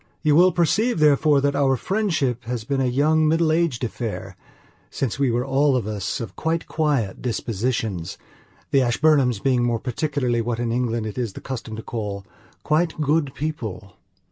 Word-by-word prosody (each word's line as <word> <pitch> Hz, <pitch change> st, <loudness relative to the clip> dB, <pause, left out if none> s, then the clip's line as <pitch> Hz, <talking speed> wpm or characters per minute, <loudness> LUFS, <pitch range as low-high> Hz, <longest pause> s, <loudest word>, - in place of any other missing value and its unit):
You 150 Hz, -2 st, +4 dB
will 180 Hz, +3 st, +6 dB
perceive, 205 Hz, +8 st, +1 dB
therefore, 150 Hz, -1 st, +4 dB
that 140 Hz, 0 st, +1 dB
our 135 Hz, -2 st, +2 dB
friendship 145 Hz, -, -1 dB
has 120 Hz, -2 st, -3 dB
been 135 Hz, +3 st, -1 dB
a -, -, +2 dB
young 155 Hz, +5 st, +3 dB
middle 160 Hz, 0 st, +2 dB
aged 160 Hz, -7 st, 0 dB
affair, 115 Hz, -1 st, -4 dB, 0.5 s
since 135 Hz, -1 st, -3 dB
we 140 Hz, -2 st, +2 dB
were 120 Hz, +1 st, 0 dB
all 135 Hz, +1 st, +2 dB
of 125 Hz, -5 st, 0 dB
us 105 Hz, -2 st, -3 dB
of 110 Hz, -5 st, -6 dB
quite 165 Hz, +1 st, -1 dB
quiet 145 Hz, -10 st, -1 dB
dispositions, 110 Hz, -6 st, -2 dB, 0.5 s
the 135 Hz, -, +4 dB
Ashburnhams 130 Hz, -1 st, +3 dB
being 125 Hz, +3 st, +1 dB
more 120 Hz, -1 st, +1 dB
particularly 125 Hz, -2 st, -1 dB
what 115 Hz, 0 st, -2 dB
in 120 Hz, -1 st, -1 dB
England 115 Hz, -2 st, -1 dB
it 110 Hz, +3 st, -5 dB
is 115 Hz, -5 st, -2 dB
the -, -, -8 dB
custom 115 Hz, -4 st, -6 dB
to 110 Hz, -, -7 dB
call 105 Hz, -4 st, -5 dB, 0.4 s
"quite 160 Hz, +1 st, +1 dB
good 150 Hz, -2 st, +1 dB
people". 115 Hz, -10 st, -5 dB
130 Hz, 170 wpm, -23 LUFS, 115-150 Hz, 0.5 s, will